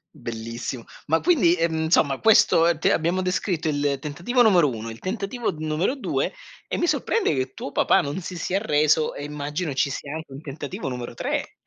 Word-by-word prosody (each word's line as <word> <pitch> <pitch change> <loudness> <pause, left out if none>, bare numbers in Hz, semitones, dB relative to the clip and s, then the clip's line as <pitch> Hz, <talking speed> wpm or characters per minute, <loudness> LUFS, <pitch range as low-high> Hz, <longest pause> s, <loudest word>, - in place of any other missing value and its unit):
Bellissimo. 115 -1 -5 0.2
Ma 160 +2 +3
quindi, 225 - +4
ehm, 165 -1 0
insomma 145 -4 +2
questo, 205 -6 +5
ehm, 170 -1 +2
t - - -9
abbiamo 175 +3 +2
descritto 180 -2 -1
il 145 -2 0
tentativo 175 - +1
numero 180 - +5
1, 115 -1 -5
il 115 - -10
tentativo 210 +4 -3
numero 155 - -1
2, 275 - -1 0.4
e - - -2
mi - - +1
sorprende 390 - +1
che 130 -1 -2
tuo - - -6
papà - - +3
non 145 +6 -4
si 180 +1 -6
sia 185 +3 -1
arreso 155 -5 +2
e 145 - -6
immagino 150 +2 -4
ci 135 - +1
sia 140 +1 -5
anche 160 -2 -7
un 135 +2 -8
tentativo 145 -2 -6
numero 125 -2 -5
3. - - -3
155 Hz, 190 wpm, -24 LUFS, 140-180 Hz, 0.4 s, questo